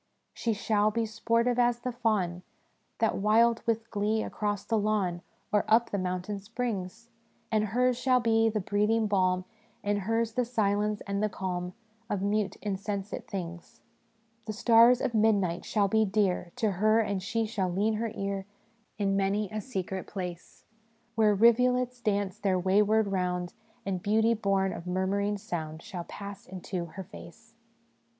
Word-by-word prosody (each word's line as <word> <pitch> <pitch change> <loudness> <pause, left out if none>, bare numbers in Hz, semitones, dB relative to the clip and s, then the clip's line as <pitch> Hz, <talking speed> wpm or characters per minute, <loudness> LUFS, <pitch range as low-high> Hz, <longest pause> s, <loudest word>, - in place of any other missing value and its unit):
" - - -47
' - - -49
She 230 - +1
shall 210 0 +2
be 230 +1 -1
sportive 230 +2 +1
as 240 -1 +2
the 250 - -2
fawn, 210 -7 0 0.6
That 225 - +1
wild 225 +3 +4
with 225 0 0
glee 215 +1 0
across 205 -1 -2
the 225 -1 +1
lawn 200 -5 0 0.3
Or 210 0 +3
up 230 +2 +3
the 200 - -1
mountain 185 +2 -3
springs; 225 0 -5 0.4
And 215 -1 +2
hers 245 +3 +1
shall 255 0 +3
be 225 -1 +3
the 215 -1 -1
breathing 210 +3 +1
balm, 185 -3 +1 0.4
And 205 0 0
hers 225 +3 0
the 250 - +1
silence 210 -3 0
and 200 0 -3
the 215 - +1
calm 180 -2 -4 0.3
Of 195 -2 -1
mute, 205 0 0
insensate 200 0 -4
things. 175 -3 -7 0.2
" - - -41
' 225 0 -40
The 215 - -2
stars 235 +2 +5
of - - -1
midnight 205 -5 +2
shall 205 -2 +2
be 220 +2 +3
dear 195 -4 0
To 225 -4 +1
her; 215 +4 +3
and 200 -3 0
she 225 +3 -1
shall 200 -5 -1
lean 205 +5 +1
her 225 0 -2
ear 195 -1 -3 0.5
In 200 -2 +1
many 195 +1 0
a 215 0 -3
secret 190 -5 -4
place 180 -3 -7 0.5
Where 215 -2 +3
rivulets 250 +3 +3
dance 200 -4 -1
their 195 -2 +1
wayward 205 +4 +3
round, 180 -2 -1 0.3
And 190 -2 -2
beauty 220 +3 +3
born 195 -3 +1
of 170 - -8
murmuring 200 +3 0
sound 165 -6 -5
Shall 175 -2 -6
pass 200 -1 -9
into 185 -1 -5
her 170 +4 -8
face.' 225 +3 -13
210 Hz, 165 wpm, -29 LUFS, 190-225 Hz, 0.6 s, stars